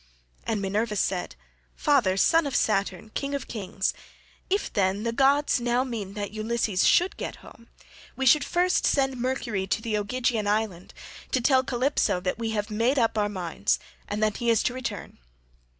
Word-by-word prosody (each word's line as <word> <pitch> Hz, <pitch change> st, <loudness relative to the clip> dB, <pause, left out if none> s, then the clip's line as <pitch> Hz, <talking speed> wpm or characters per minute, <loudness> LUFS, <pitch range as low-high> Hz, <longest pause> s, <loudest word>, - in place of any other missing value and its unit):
And 215 Hz, -3 st, -1 dB
Minerva 210 Hz, +3 st, -1 dB
said, 185 Hz, -, -1 dB, 0.4 s
"Father, 240 Hz, -11 st, +2 dB
son 325 Hz, +8 st, +4 dB
of 275 Hz, -, -4 dB
Saturn, 215 Hz, +1 st, 0 dB
King 280 Hz, 0 st, -2 dB
of 280 Hz, -, -5 dB
kings, 195 Hz, -3 st, -2 dB, 0.6 s
if, 400 Hz, +2 st, -1 dB
then, 195 Hz, 0 st, +1 dB
the 230 Hz, -, 0 dB
gods 275 Hz, +3 st, +3 dB
now 240 Hz, +1 st, +1 dB
mean 215 Hz, -6 st, -5 dB
that 205 Hz, -1 st, -4 dB
Ulysses 215 Hz, -2 st, 0 dB
should 360 Hz, +2 st, +3 dB
get -, -, -5 dB
home, 230 Hz, -, -16 dB, 0.5 s
we 265 Hz, -, -2 dB
should 290 Hz, +4 st, +6 dB
first 360 Hz, +1 st, +1 dB
send 270 Hz, -2 st, +1 dB
Mercury 235 Hz, -6 st, -2 dB
to -, -, 0 dB
the 220 Hz, -1 st, -2 dB
Ogygian 235 Hz, 0 st, -1 dB
island 205 Hz, -4 st, -2 dB, 0.4 s
to 260 Hz, -, +3 dB
tell 260 Hz, +1 st, +3 dB
Calypso 255 Hz, -6 st, +1 dB
that 180 Hz, +4 st, -3 dB
we 225 Hz, -1 st, -2 dB
have 210 Hz, -1 st, -2 dB
made 230 Hz, +6 st, +1 dB
up 230 Hz, -3 st, +2 dB
our 210 Hz, -1 st, +1 dB
minds 185 Hz, 0 st, -1 dB, 0.3 s
and 210 Hz, +1 st, -2 dB
that 215 Hz, -1 st, +1 dB
he 235 Hz, -, 0 dB
is 225 Hz, -2 st, +3 dB
to -, -, 0 dB
return. 240 Hz, -, -6 dB
225 Hz, 175 wpm, -26 LUFS, 205-260 Hz, 0.6 s, should